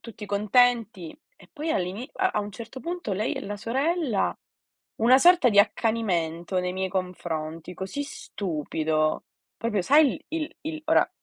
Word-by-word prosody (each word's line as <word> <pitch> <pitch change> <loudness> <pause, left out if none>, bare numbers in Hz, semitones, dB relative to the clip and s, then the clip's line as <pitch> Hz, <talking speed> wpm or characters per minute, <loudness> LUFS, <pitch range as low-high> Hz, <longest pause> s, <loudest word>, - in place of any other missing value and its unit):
tutti 220 -3 -9
contenti 215 - +2 0.2
e - - -19
poi 315 +2 -3
all'ini 195 - -2
a 380 0 +1
a 210 - +1
un 205 - -5
certo 230 +4 -9
punto 345 - -4
lei 200 +3 -1
e - - -4
la 205 +1 -5
sorella, 270 - 0 0.6
una 245 +4 +6
sorta 350 -3 +6
di 205 -3 +3
accanimento 190 -5 +1
nei 180 0 -1
miei 190 0 -2
confronti 175 -3 -4
così 190 +11 -4
stupido. 155 - -2 0.3
Proprio 220 -4 -1
sai 290 - +5
l 310 - -19
il 320 0 -4
il 315 0 -5
ora, - - +4
210 Hz, 155 wpm, -26 LUFS, 180-265 Hz, 0.6 s, una